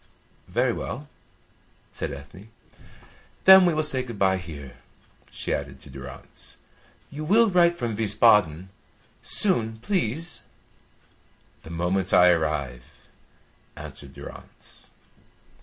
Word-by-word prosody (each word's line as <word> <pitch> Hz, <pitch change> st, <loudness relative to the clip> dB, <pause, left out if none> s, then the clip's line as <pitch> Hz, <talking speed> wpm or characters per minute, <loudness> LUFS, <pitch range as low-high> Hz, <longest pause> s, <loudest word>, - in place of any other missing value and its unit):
"Very -, -, +1 dB
well," -, -, -6 dB, 0.9 s
said -, -, -4 dB
Ethne. 70 Hz, +10 st, -11 dB, 1.0 s
"Then 190 Hz, -1 st, +9 dB
we 175 Hz, -, +2 dB
will 155 Hz, -, +1 dB
say 135 Hz, -4 st, +2 dB
good 120 Hz, -4 st, -8 dB
bye 95 Hz, -1 st, +2 dB
here," 75 Hz, -7 st, -10 dB, 0.5 s
she -, -, -4 dB
added 70 Hz, -2 st, -5 dB
to 70 Hz, -, -14 dB
Durrance. 65 Hz, -1 st, -11 dB, 0.5 s
"You 150 Hz, +2 st, -6 dB
will 215 Hz, +6 st, +4 dB
write 175 Hz, -1 st, +4 dB
from 115 Hz, -6 st, -3 dB
Wiesbaden? 105 Hz, -5 st, +3 dB, 0.5 s
Soon, 115 Hz, -, +2 dB
please!" 165 Hz, -, -2 dB, 1.2 s
"The -, -, -13 dB
moment 90 Hz, +3 st, -1 dB
I 90 Hz, 0 st, +7 dB
arrive," 70 Hz, -7 st, -3 dB, 0.7 s
answered 70 Hz, -1 st, -11 dB
Durrance. -, -, -11 dB
100 Hz, 110 wpm, -25 LUFS, -, 1.2 s, Then